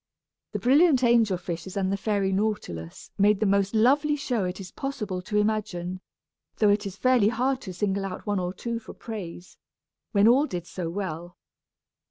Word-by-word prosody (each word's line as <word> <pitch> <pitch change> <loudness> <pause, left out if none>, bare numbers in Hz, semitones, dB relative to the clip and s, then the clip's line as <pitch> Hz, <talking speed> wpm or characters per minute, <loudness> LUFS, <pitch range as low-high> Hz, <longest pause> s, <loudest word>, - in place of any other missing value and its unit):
The - - 0
brilliant 275 +1 +4
angel 230 -5 +4
fishes 175 +2 -6
and 190 -1 0
the - - +1
fairy 200 -1 0
nautilus 190 - -3
made 205 0 +4
the 215 - +1
most 200 +1 +2
lovely 285 +7 +4
show 245 -8 -1
it 180 +1 -4
is 190 -1 -8
possible 210 -9 -4
to 210 +3 -2
imagine; 195 -4 -1 0.6
though 210 - +4
it 205 0 +2
is 195 0 -8
hardly 250 -5 +5
fair 250 +4 +1
to 205 -7 -8
single 195 +1 -1
out 190 - -6
one 205 -2 0
or 180 0 -2
two 235 +4 -4
for 230 - -12
praise, 185 -6 -8 0.5
when 205 -1 +4
all 270 +6 +5
did 175 - -5
so 175 -1 -5
well. 175 -2 -5
205 Hz, 180 wpm, -26 LUFS, 185-230 Hz, 0.6 s, hardly